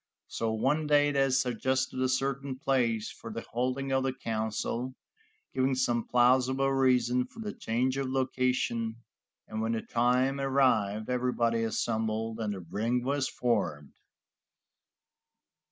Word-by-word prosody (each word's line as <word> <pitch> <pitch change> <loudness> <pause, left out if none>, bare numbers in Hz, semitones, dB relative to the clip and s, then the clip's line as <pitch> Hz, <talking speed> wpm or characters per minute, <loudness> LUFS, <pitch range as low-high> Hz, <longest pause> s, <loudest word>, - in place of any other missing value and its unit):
So 115 -1 -1
one 150 +8 +1
day 145 0 +4
they 135 -1 +2
suggested 130 +1 0
a 130 - +2
certain 135 +1 -1
place 120 -6 0
for 115 - -9
the 115 - -6
holding 130 +3 -1
of 135 0 +2
the 135 - +1
council, 115 +1 -3 0.6
giving 130 0 +1
some 120 -2 0
plausible 130 +2 +3
reason 125 -2 +2
for 225 - -15
the 210 -2 -4
change 125 +4 -1
of 135 -1 -1
location, 125 -3 0 0.5
and 110 0 -4
when 115 +1 0
the 115 - -2
time 125 +3 +1
arrived, 120 -7 +2
everybody 120 -2 +1
assembled, 110 0 -1
and 105 -2 -2
the 95 - -7
ring 115 +8 -1
was 140 +1 0
formed. 75 - -1
125 Hz, 135 wpm, -29 LUFS, 115-135 Hz, 0.6 s, day